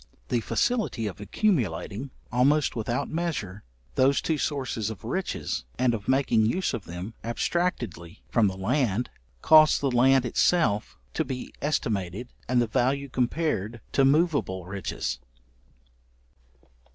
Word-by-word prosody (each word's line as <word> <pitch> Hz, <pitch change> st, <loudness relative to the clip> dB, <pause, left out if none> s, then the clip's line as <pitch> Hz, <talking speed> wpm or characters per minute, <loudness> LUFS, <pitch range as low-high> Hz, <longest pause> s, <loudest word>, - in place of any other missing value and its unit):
The 120 Hz, -, +2 dB
facility 215 Hz, -, 0 dB
of 105 Hz, -1 st, -5 dB
accumulating, 110 Hz, -, -1 dB, 0.2 s
almost 135 Hz, +4 st, +3 dB
without 120 Hz, +1 st, -1 dB
measure, 155 Hz, -, -3 dB, 0.3 s
those 135 Hz, -, +3 dB
two 160 Hz, -2 st, -1 dB
sources 130 Hz, -8 st, -2 dB
of 110 Hz, -4 st, -8 dB
riches, -, -, -3 dB
and 125 Hz, -1 st, +2 dB
of 105 Hz, -2 st, -5 dB
making 130 Hz, -5 st, +3 dB
use 185 Hz, +11 st, 0 dB
of 110 Hz, -4 st, -4 dB
them 90 Hz, +6 st, -7 dB
abstractedly 115 Hz, -, -2 dB
from 115 Hz, -3 st, +3 dB
the 95 Hz, -1 st, -3 dB
land, 115 Hz, +2 st, 0 dB, 0.3 s
caused 155 Hz, -1 st, +7 dB
the 140 Hz, -2 st, 0 dB
land 130 Hz, +1 st, +4 dB
itself 120 Hz, -4 st, +1 dB, 0.2 s
to -, -, 0 dB
be 130 Hz, -1 st, -6 dB
estimated, 110 Hz, -, -2 dB, 0.2 s
and 125 Hz, -1 st, +3 dB
the 120 Hz, -, +3 dB
value 135 Hz, +4 st, 0 dB
compared 125 Hz, -, -1 dB
to 135 Hz, -, +3 dB
moveable 140 Hz, -, +2 dB
riches. 90 Hz, -7 st, -4 dB
120 Hz, 125 wpm, -26 LUFS, 105-140 Hz, 0.3 s, caused